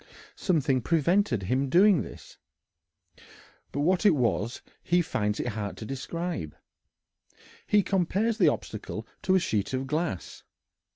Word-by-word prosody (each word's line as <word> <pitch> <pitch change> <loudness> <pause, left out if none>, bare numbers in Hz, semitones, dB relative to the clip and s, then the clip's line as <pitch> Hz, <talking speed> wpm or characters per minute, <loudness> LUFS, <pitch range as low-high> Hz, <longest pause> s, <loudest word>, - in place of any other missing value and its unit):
Something 140 -8 +1
prevented 165 - +2
his 130 +8 0
doing 185 +5 +5
this, - - -11 1.3
but 145 - -2
what 180 +6 +2
it 200 -6 +5
was 120 -3 -1 0.2
he 175 +1 +2
finds 105 -8 -1
it - - -1
hard 105 -3 -4
to 110 - -7
describe. 135 - -4 1.1
He 210 -1 +4
compares 200 +5 0
the 175 - +5
obstacle 110 -4 -5 0.2
to 190 - +2
a - - +5
sheet 110 - -1
of 130 +1 -2
glass. 150 - -3
145 Hz, 130 wpm, -27 LUFS, 115-180 Hz, 1.3 s, doing